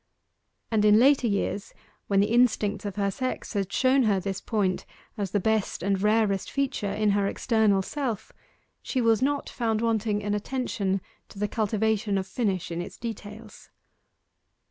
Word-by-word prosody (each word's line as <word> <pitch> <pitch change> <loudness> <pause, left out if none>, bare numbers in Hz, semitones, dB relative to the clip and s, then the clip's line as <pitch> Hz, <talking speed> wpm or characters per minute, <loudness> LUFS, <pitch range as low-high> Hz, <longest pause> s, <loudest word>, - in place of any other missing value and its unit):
And 215 -2 +2
in 210 0 +6
later 260 +1 +5
years, 200 -1 -2 0.3
when 195 -1 +3
the 210 +3 +1
instincts 225 -4 +2
of 200 - -4
her 200 -1 0
sex 255 +4 -4
had 195 -2 -1
shown 260 +4 +3
her 200 -3 +2
this 195 +1 -4
point 200 -5 0 0.3
as 200 -4 -3
the 205 - +1
best 215 -3 0
and 195 0 +1
rarest 210 -2 +2
feature 270 -7 -1
in 210 0 +1
her 200 0 +2
external 210 -3 +2
self, 250 -4 -4 0.5
she 260 - -2
was 230 -1 +3
not 285 +2 0
found 225 -3 -1
wanting 220 -2 0
in 205 0 -1
attention 210 -4 -1 0.3
to - - -14
the 210 +1 0
cultivation 215 -1 0
of 190 - -1
finish 190 -4 -2
in 170 +1 -2
its 175 - -8
details. 220 -1 -8
210 Hz, 165 wpm, -26 LUFS, 200-230 Hz, 0.5 s, in